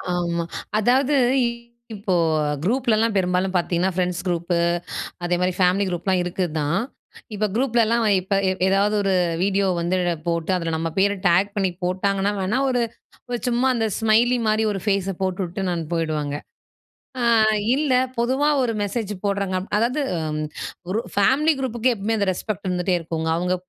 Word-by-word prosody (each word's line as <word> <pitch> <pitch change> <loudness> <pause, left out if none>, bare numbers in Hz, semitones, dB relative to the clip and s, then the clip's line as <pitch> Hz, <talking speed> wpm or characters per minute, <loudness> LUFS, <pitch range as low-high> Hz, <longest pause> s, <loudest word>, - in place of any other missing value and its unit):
ஆமா, 170 -1 -1 0.4
அதாவது 260 +6 +3 0.3
இ - - +2 0.5
இப்போ 200 -2 -2 0.5
குரூப்லலாம் 230 0 +2
பெரும்பாலும் 185 0 +1
பார்த்தீங்கன்னா, 175 +1 +1
ஃப்ரெண்ட்ஸ் 180 -1 -1
குரூப்பு, 175 0 -1 0.7
அதே 175 0 +1
மாதிரி 180 0 +1
ஃபேமிலி 185 +2 +3
குரூப்லாம் 180 +1 0
இருக்கு 180 +1 -1
தான். 150 +6 0 0.6
இப்ப 210 +1 0
குரூப்லலாம் 235 -2 +2 0.2
இப்ப 195 +2 -1
எ - - +2 0.2
ஏதாவது 200 +2 +2
ஒரு 195 -1 +1 0.3
வீடியோ 195 0 +1
வந்து 175 +2 0 0.3
போட்டு 170 +1 0
அதில 165 -2 -2
நம்ம 165 0 -2
பேர 200 +1 +4 0.2
டேக் 190 +4 +3
பண்ணி 190 -2 +1
போட்டாங்கன்னா, 195 +2 0
வேணா 215 +8 0
ஒரு, 245 -2 +1 0.5
ஒரு 245 -1 -2
சும்மா 245 +2 +2
அந்த 225 -2 0
ஸ்மைலி 230 +3 +3
மாரி 215 +1 +2
ஒரு 195 -2 -4
ஃபேஸ 195 -2 0
போட்டுவிட்டு 185 -2 -2
போயிடுவாங்க. 155 -3 -1 0.9
ஆ - - +1 0.5
இல்ல 290 -2 0 0.2
பொதுவா 260 +5 +1
ஒரு 235 - 0
மெசேஜ் 205 +1 -2
போடுறாங்க 200 -2 0 0.2
அதாவது 240 +7 +1 0.3
ம் 155 - -2 0.5
ஒரு 195 +4 0 0.2
ஃபேமிலி 275 +10 +3
குரூப்புக்கு 250 -1 0
எப்பமே 220 +1 -1
அந்த 200 - +1
ரெஸ்பெக்ட் 200 +1 -5
இருந்துட்டே 180 +1 0
இருக்குங்க. 165 -1 -3
அவுங்க 180 +1 0
195 Hz, 145 wpm, -22 LUFS, 180-225 Hz, 0.9 s, பேர